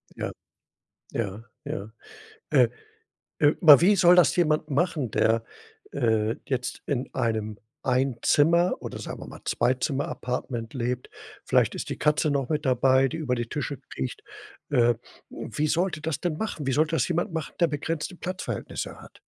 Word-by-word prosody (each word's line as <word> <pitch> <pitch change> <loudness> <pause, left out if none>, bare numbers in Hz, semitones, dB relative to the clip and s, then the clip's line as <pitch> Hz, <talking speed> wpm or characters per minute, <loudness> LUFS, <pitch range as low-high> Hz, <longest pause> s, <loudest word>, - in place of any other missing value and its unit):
Ja. - - -3 0.8
Ja, 105 -1 -3 0.2
ja. 100 +2 -5 0.6
Äh, - - +5 0.7
äh, 145 -1 +5
aber 150 -5 +9
wie 200 +4 +6
soll 175 0 +6
das 160 -6 +5
jemand 155 -3 +1
machen, 145 -4 0
der, 115 +2 +2 0.5
äh, 110 -1 +1
jetzt 125 -2 -2
in 135 -2 -2
einem 110 -2 -1 0.2
Ein-Zimmer 135 +7 +3
oder - - -6
sagen - - -7
wir - - -8
mal, - - -11
Zwei-Zimmer-Apartment 125 -3 -1
lebt? 125 0 -3 0.3
Vielleicht - - +2
ist - - -5
die - - -4
Katze 150 0 +2
noch 140 -3 0
mit 155 -1 -1
dabei, 130 +1 +4
die 160 - -5
über 130 -5 0
die 120 -1 -3
Tische 145 +1 -3 0.2
kriecht. 65 -1 -4 0.5
Äh, 120 -4 +4 0.4
wie 145 +7 -3
soll 175 +5 +1
der 155 - -6
das 160 -1 -2
denn 175 -4 -1
machen? 195 -10 -4
Wie 135 - +1
soll 155 +4 +3
das 165 +1 0
jemand 175 +1 0
machen, 160 -3 -4
der 170 - +6
begrenzte 160 +4 -3
Platzverhältnisse 185 +2 -5
hat? - - -15
140 Hz, 160 wpm, -26 LUFS, 120-160 Hz, 0.8 s, aber